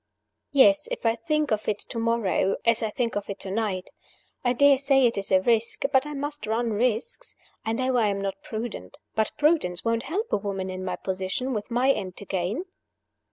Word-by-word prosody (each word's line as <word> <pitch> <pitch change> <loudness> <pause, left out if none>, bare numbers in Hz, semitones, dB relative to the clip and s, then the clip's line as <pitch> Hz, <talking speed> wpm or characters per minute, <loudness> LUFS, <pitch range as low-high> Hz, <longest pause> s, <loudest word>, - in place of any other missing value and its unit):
"Yes, 295 +1 +5
if - - -5
I 225 0 +3
think 300 +5 -1
of 215 0 0
it 210 - +1
to 230 - -6
morrow 230 -4 +1
as 230 -1 +4
I 220 - 0
think 235 +2 -2
of 205 0 -3
it 200 - -5
to 190 - -3
night. 195 -3 -2 0.5
I 245 - +3
dare 275 +2 +5
say 275 -1 +4
it 235 - +2
is 200 0 -4
a 190 -1 +5
risk; 230 0 +1
but 265 +2 +4
I 295 - -5
must 290 0 -4
run 225 +1 0
risks. 240 - -1 0.3
I 225 - -1
know 255 +1 +1
I 225 -3 +3
am 200 -1 -1
not 195 0 -4
prudent; 220 - -6 0.2
but 220 0 +1
prudence 295 - +2
won't 230 0 +1
help 425 +7 -2
a - - +5
woman 195 -2 -3
in 185 0 -5
my 180 -1 -2
position, 190 +8 -3
with 210 -2 -4
my 250 +3 +3
end 185 -8 -4
to 200 - -9
gain." 195 - -2
230 Hz, 210 wpm, -26 LUFS, 200-260 Hz, 0.5 s, Yes